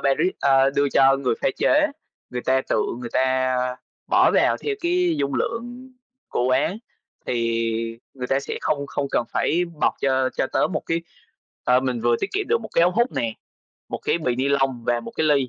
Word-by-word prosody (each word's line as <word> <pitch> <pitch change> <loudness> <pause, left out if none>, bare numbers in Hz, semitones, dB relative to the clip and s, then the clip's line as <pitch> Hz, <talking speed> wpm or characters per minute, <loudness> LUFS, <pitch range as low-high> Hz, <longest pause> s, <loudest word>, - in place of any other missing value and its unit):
baris 155 +7 +2
a, 135 -1 +4
đưa 140 +1 +1
cho 135 0 +5
người 130 -4 0
pha - - +3
chế, 300 0 +3 0.4
người 125 -1 -4
ta 130 0 +2
tự - - +2 0.2
người 120 -1 -6
ta 130 0 +1 0.5
bỏ - - +4
vào - - +3
theo 430 - -3
cái 350 -1 +1
dung 140 - -1
lượng 245 +3 -4 0.4
của 120 - -1
quán, 130 - +1 0.5
thì 115 -1 -1 0.2
người 125 -2 -5
ta 135 +2 +1
sẽ 140 - -5
không 140 -2 -1
không 140 0 -2
cần 120 - +1
phải 175 +2 +1 0.2
bọc - - +2
cho 130 -1 +2
cho - - +1
tớ - - +1
một 155 - -3
cái 165 0 -1 0.6
ờ, 125 +1 +4
mình 125 -3 -2
vừa 120 0 +3
tiết - - -3
kiệm 405 +1 -1
được 465 +1 +1
một - - -8
cái 170 - +4
ống 175 +1 +4
hút 240 +3 +2
nè, 115 -1 -2 0.6
một - - -4
cái 170 - 0
bì 125 -6 -1
ni 135 +2 0
lông 135 -3 +1
và 120 -1 +1
một - - -8
cái 160 - +1
ly. 140 -4 +3
135 Hz, 210 wpm, -23 LUFS, 125-170 Hz, 0.6 s, cho